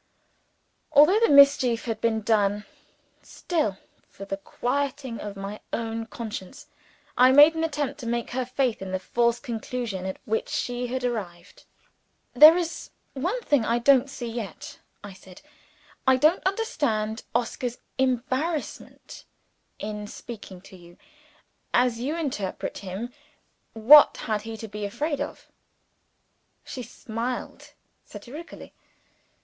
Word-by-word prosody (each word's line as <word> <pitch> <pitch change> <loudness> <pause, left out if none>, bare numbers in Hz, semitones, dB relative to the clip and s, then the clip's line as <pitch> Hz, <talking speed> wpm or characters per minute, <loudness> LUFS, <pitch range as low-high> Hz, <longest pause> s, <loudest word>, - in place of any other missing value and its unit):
Although 325 +9 +6
the 460 - +3
mischief 280 -4 +5
had 225 -2 -3
been 225 -1 +1
done 205 -1 +1 0.6
still, 305 - -2 0.3
for 195 - -10
the 195 0 -4
quieting 260 +3 -3
of 205 -1 -6
my 195 +2 -6
own 225 0 -3
conscience, 225 +1 -7 0.5
I 255 +1 +6
made 295 +4 +8
an 325 0 -2
attempt 295 -3 -2
to 235 -4 -5
shake 235 0 -2
her 255 +1 -1
faith 250 -2 -1
in 190 -1 -6
the - - +1
false 235 +5 0
conclusion 230 -6 -4
at 190 - -5
which 470 +3 -2
she 245 - -2
had 255 +1 -3
arrived. 195 -8 -5 0.7
"There 305 +6 +9
is 340 -2 -4 0.2
one 360 - -2
thing 290 - +2
I 230 +2 +1
don't 270 +2 +4
see 255 -3 -7
yet," 230 -3 -7 0.2
I 205 -1 -9
said. 185 +2 -16 0.6
"I 260 0 +6
don't 310 +7 +3
understand 235 - -1
Oscar's 240 0 -2 0.2
embarrassment 265 +5 -3 0.5
in 210 0 -6
speaking 205 -5 -10
to 190 - -15
you. 175 -1 -16 0.8
As 245 -2 +2
you 275 +6 -2
interpret 260 - -4
him, 200 +6 -6 0.6
what 260 +7 +7
had 215 -3 -1
he 225 +1 -7
to 225 - -7
be 210 0 -7
afraid 290 +9 -2
of?" - - -6 1.2
She 255 - -7
smiled 235 +1 -6 0.3
satirically. 300 +7 -11
240 Hz, 130 wpm, -25 LUFS, 215-280 Hz, 1.2 s, There